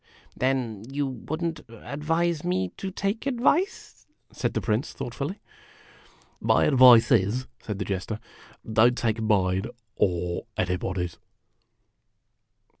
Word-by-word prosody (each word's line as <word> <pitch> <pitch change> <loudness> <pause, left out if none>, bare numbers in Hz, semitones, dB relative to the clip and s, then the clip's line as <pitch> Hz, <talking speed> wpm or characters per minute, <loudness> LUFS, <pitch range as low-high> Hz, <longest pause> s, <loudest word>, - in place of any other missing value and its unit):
Then 125 -6 -1
you 145 +1 -1
would 140 +6 -5
n't 165 -1 -3
advise 150 +8 -2
me 95 - 0
to 195 - -6
take 200 +6 -2
advice? 275 +9 0
" - - -39
said - - -2
the - - +2
Prince, 110 +4 -1
thoughtfully. 140 - -5 0.6
" - - -29
My - - +5
advice 125 -3 +7
is," 120 +3 +2 0.2
said 105 -3 -5
the 100 - -3
Jester, 100 +3 -3 0.5
"don't 120 +3 +5
take 115 -1 0
mine, 95 -3 +2 0.3
or 90 -2 -1
anybody's." 90 -1 -2
120 Hz, 120 wpm, -26 LUFS, 100-150 Hz, 0.6 s, advice